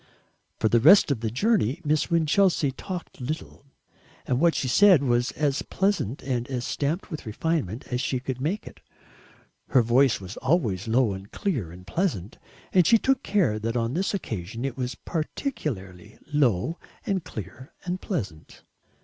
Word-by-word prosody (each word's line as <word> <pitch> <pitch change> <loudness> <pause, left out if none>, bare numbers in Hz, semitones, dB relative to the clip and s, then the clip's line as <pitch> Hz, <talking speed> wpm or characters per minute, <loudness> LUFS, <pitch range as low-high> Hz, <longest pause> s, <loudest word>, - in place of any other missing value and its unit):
For - - +2
the 120 +2 +4
rest 160 - +7
of 135 - 0
the 115 0 -2
journey 165 - +1
Miss 150 +1 +1
Winchelsea 165 -2 +3
talked 180 0 -7
little, 150 +1 -5 0.6
and 125 - 0
what 170 +1 +4
she 130 - -1
said 180 +3 +6
was 120 -1 +2
as 145 -2 0
pleasant 190 - -1
and 125 -2 -2
as 125 -2 -3
stamped 155 +7 -2
with 155 -6 -6
refinement 125 - -2
as 125 - 0
she 130 -1 -1
could 130 0 -5
make 175 +9 -2
it. - - -12 0.9
Her 125 - +4
voice 125 +3 +3
was 95 -1 -9
always 120 - 0
low 115 -2 +2
and 95 +1 -9
clear 135 - -2
and 90 +1 -12
pleasant, 110 - -2 0.3
and 180 -3 +5
she 230 - +7
took 265 +3 +1
care 185 - +1
that 115 +2 -2
on 115 +1 -1
this 190 +5 0
occasion 115 - -5
it 135 -3 -3
was 125 -1 -3
particularly 120 - -5 0.2
low 140 - +1 0.3
and 190 -4 -1
clear 110 - -9
and 180 +1 -3
pleasant. 95 - -5
130 Hz, 165 wpm, -26 LUFS, 115-170 Hz, 0.9 s, rest